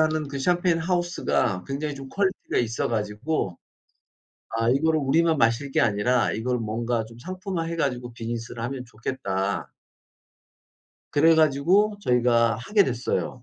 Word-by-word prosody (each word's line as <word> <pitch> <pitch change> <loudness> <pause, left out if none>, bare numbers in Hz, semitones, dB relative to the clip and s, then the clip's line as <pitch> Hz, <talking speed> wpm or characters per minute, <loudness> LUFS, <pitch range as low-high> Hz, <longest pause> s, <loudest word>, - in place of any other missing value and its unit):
하는 155 -1 +1
그 140 0 -5
샴페인 175 +3 +2
하우스가 175 - 0
굉장히 145 +2 -3
좀 135 -1 -9
퀄리티가 195 +4 -1
있어 115 -1 0
가지고 105 - -2 0.9
'아, 115 +1 0
이거를 155 +5 +2
우리만 160 +3 +2
마실 115 +4 +1
게 - - +1
아니라 120 +3 +2
이걸 125 +3 -1
뭔가 115 +1 -2
좀 115 +1 -14
상품화해 185 - -4
가지고 125 -5 -1
비즈니스를 115 0 -5
하면 125 +1 -4
좋겠다.' 100 -4 -3 1.4
그래 160 +3 +5
가지고 165 +8 +3
저희가 120 - +3
하게 200 - +2
됐어요. 125 0 -2
130 Hz, 315 characters per minute, -25 LUFS, 115-160 Hz, 1.4 s, 그래